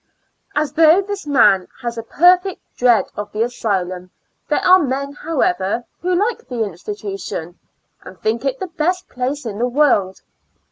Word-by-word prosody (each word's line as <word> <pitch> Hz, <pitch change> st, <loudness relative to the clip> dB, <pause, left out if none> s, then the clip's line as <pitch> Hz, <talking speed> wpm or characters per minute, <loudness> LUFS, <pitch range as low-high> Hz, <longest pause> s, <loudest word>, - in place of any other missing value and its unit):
And 300 Hz, 0 st, +2 dB
though 325 Hz, +5 st, +5 dB
this 400 Hz, -5 st, -6 dB
man 210 Hz, -9 st, +4 dB, 0.2 s
has 235 Hz, -1 st, -3 dB
a 230 Hz, -, -4 dB
perfect 360 Hz, -, +3 dB, 0.2 s
dread 245 Hz, -2 st, +3 dB
of 205 Hz, 0 st, -5 dB
the 215 Hz, +2 st, 0 dB
asylum, 185 Hz, -6 st, -2 dB, 0.4 s
there 295 Hz, -, 0 dB
are 370 Hz, +1 st, +7 dB
men, 280 Hz, -2 st, -2 dB
however^ 235 Hz, -, -1 dB, 0.2 s
who 360 Hz, +1 st, 0 dB
like 455 Hz, +5 st, -1 dB
the 240 Hz, -3 st, -2 dB
institution, 195 Hz, -3 st, -6 dB, 0.4 s
and 185 Hz, -, -13 dB
think 225 Hz, +5 st, -1 dB
it 270 Hz, -1 st, -1 dB
the -, -, -3 dB
best 355 Hz, +2 st, -2 dB
place 255 Hz, +3 st, -3 dB
in 210 Hz, -2 st, -5 dB
the 245 Hz, -, +1 dB
world. 240 Hz, -9 st, +2 dB
250 Hz, 155 wpm, -19 LUFS, 205-325 Hz, 0.4 s, are